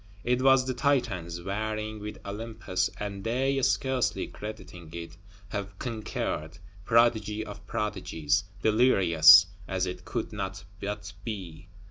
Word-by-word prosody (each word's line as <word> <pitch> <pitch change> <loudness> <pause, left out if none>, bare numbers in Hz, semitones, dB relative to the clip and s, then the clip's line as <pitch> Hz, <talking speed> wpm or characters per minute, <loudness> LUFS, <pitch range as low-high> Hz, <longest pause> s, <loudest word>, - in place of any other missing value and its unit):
It 125 +1 +1
was 135 -1 +5
the 130 - -1
Titans 110 - 0
warring 110 +2 -3
with 105 +1 -6
Olympus; 100 -3 -2
and 100 -1 -5
they, 135 +4 +1
scarcely 130 -1 +1
crediting 105 -6 -9
it, 85 0 -7 0.3
have 100 -1 -5
conquered; 105 -8 -4 0.3
prodigy 110 -2 +3
of 100 -1 -10
prodigies; 95 -7 -1 0.2
delirious, 90 -7 +7 0.2
as 95 -1 0
it 90 - -6
could - - -4
not 95 0 -4 0.2
but 100 -1 -5
be. 90 -6 -6
105 Hz, 120 wpm, -28 LUFS, 90-115 Hz, 0.3 s, delirious